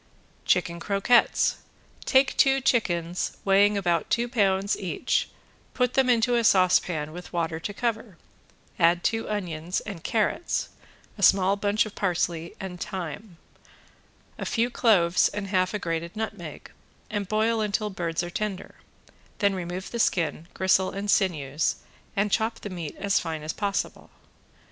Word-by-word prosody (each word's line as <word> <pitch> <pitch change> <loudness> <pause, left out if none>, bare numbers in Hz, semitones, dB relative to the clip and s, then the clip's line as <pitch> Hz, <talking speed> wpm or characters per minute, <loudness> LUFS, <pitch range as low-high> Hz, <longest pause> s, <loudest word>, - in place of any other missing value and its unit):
~CHICKEN 170 -1 +1
CROQUETTES~ 200 +6 +3 0.5
Take 265 +1 +3
two 270 -1 +4
chickens 175 -9 0
weighing 200 +1 +4
about 175 -4 0
two 235 +1 +1
pounds 200 -4 +1
each, 185 -3 -1 0.5
put 250 -1 +1
them 265 -1 +3
into 240 0 +3
a 235 -1 +2
saucepan 180 -6 +3
with 180 +2 -9
water 165 -2 -2
to 185 - -4
cover, 220 -3 -3 0.6
add 170 0 +4
two 225 -1 -1
onions 180 -4 -2
and 195 -6 -8
carrots, 230 +10 0 0.5
a - - -5
small 195 0 +5
bunch 205 +2 +1
of 215 - -8
parsley 170 -3 -1
and 180 -2 -7
thyme, 180 0 -6 1.0
a - - -3
few 235 +1 0
cloves 180 -9 +4
and 205 -1 -5
half 185 -1 +1
a 210 - -2
grated 170 -1 -4
nutmeg, 205 -8 -6 0.4
and 205 -2 -2
boil 220 +2 +1
until 210 0 -1
birds 170 -2 -2
are 175 - -6
tender; 200 0 -4 0.6
then 200 -2 +2
remove 180 0 -5
the 235 - -4
skin, 165 -5 0
gristle 190 0 +3
and 200 +1 -2
sinews 155 -6 +1 0.4
and 200 0 +1
chop 225 +1 0
the 205 - -6
meat 170 -5 -6
as 200 -2 +1
fine 160 -2 -5
as 155 - -3
possible. 200 -2 -3
195 Hz, 145 wpm, -26 LUFS, 175-215 Hz, 1.0 s, small